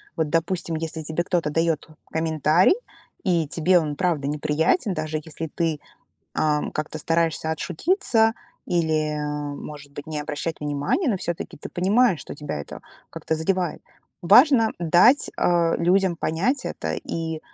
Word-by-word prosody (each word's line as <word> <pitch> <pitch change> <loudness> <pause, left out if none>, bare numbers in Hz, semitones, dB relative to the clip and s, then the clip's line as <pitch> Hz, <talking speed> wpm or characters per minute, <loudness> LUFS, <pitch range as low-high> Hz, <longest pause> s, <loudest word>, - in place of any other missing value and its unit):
Вот, 155 -2 -1
допустим, 165 0 -1
если 160 0 -4
тебе 160 +3 -1
кто-то 175 -4 0
дает 165 0 0 0.2
комментарий 160 - +3 0.5
и 170 -6 +1
тебе 175 +3 +3
он 150 -2 -3
правда 165 -5 0
неприятен, 155 - +1
даже 155 -1 -3
если 160 0 -6
ты, 165 -3 -1 0.6
а, 150 -1 +1
как-то 155 +1 -4
стараешься 165 0 0
отшутиться 225 - +1 0.3
или, 155 -3 0 0.4
может 145 -1 -9
быть, 145 +1 -8
не 155 -1 -3
обращать 150 +2 -4
внимания, 145 - 0
но 210 - +1
всё-таки 170 -2 -5
ты - - -7
понимаешь, 195 +1 +2
что - - -8
тебя 145 - -5
это - - -9 0.3
как-то 160 - -3
задевает. 175 +2 -1 0.4
Важно 230 - +6
дать, 175 - +4
а, 170 -1 +2
людям 185 +1 +2
понять 205 - 0
это 80 0 -3
и, 160 - -4
165 Hz, 140 wpm, -24 LUFS, 155-180 Hz, 0.6 s, Важно